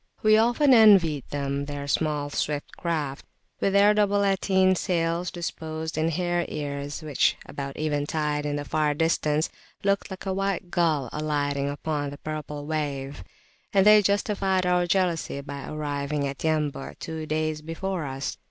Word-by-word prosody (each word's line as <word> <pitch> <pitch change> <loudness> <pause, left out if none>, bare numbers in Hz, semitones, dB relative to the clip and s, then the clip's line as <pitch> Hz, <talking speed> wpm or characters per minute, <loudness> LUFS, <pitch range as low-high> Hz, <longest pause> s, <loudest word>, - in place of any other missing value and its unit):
We 215 0 +6
often 240 +5 +4
envied 190 - +6
them 140 0 -2
their 145 -1 -5
small 145 0 0
swift 145 0 -2
craft, 150 -5 -3 0.4
with 195 - +1
their 200 +1 +6
double 205 -1 +2
latine 190 -1 +3
sails 170 -1 0
disposed 160 -2 -5
in 160 +1 +1
"hare 175 +1 0
ears" 145 +1 -4
which, 150 -4 +2
about 140 -1 -6
eventide 150 0 -1
in 145 0 -2
the 145 0 -3
far 150 +1 +1
distance, 155 -1 +1 0.3
looked 200 0 +1
like 190 0 -8
a 190 - -1
white 195 -2 -2
gull 160 -7 +1
alighting 145 -2 -1
upon 145 0 -2
the 145 - -8
purple 150 -1 -6
wave; 145 - -3 0.5
and 195 -1 +4
they 210 0 +8
justified 200 -2 +1
our 180 0 +2
jealousy 175 -6 0
by 140 0 -7
arriving 145 -1 -2
at 135 0 -6
Yambu' 155 -3 -1
two 160 -1 -6
days 155 0 -1
before 165 +2 -3
us. 135 0 -4
155 Hz, 150 wpm, -26 LUFS, 145-185 Hz, 0.5 s, they